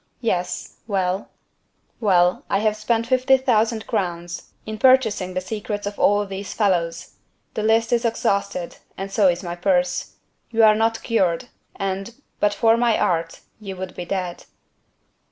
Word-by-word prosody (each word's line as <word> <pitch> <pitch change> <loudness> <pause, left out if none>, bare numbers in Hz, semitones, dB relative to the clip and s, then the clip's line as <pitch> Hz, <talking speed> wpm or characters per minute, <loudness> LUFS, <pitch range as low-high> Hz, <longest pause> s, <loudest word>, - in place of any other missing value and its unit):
"Yes. 180 -6 -2
Well?" 190 -2 -1 0.7
"Well, 180 -4 +3
I - - +2
have 215 +1 +1
spent 225 +2 0
fifty 255 +2 +4
thousand 225 -3 +1
crowns 175 -5 -3 0.2
in 215 0 -6
purchasing 220 -8 +3
the 185 - 0
secrets 205 +1 -4
of 205 0 -5
all 205 0 +3
these 195 0 -6
fellows: 170 -5 0 0.4
the - - -2
list 225 +2 +2
is 235 - +2
exhausted, 200 -5 -1 0.2
and 195 0 -5
so 200 -1 +4
is 175 0 +1
my 175 -1 -4
purse. 180 0 0 0.4
You 225 -1 +3
are 215 -1 +8
not 225 +1 0
cured: 195 -2 0 0.3
and, 195 +3 -3 0.2
but 205 - +3
for 225 +1 +4
my 235 -2 +3
art, 165 -1 -1 0.2
you 195 -3 -7
would 185 0 -6
be 175 - -5
dead." 180 -1 -4
205 Hz, 155 wpm, -22 LUFS, 180-225 Hz, 0.7 s, are